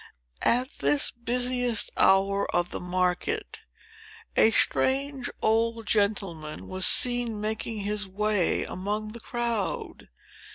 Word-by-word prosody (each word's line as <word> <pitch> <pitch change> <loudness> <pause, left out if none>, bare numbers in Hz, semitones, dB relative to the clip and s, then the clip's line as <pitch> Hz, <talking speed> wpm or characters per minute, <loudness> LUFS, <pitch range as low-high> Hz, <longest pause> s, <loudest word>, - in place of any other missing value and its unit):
At 250 +2 +3
this 140 +1 +3
busiest 245 -1 0
hour 195 +1 +3
of 175 0 0
the - - -4
market, 185 - -2 0.7
a - - +6
strange 270 +3 0
old 225 +1 +1
gentleman 195 -8 -1
was 185 0 +2
seen 245 -3 +3
making 220 0 -3
his 205 0 -2
way 205 -1 0
among 210 +3 -4
the 235 - -9
crowd. 235 -3 -3
215 Hz, 110 wpm, -26 LUFS, 195-240 Hz, 0.7 s, a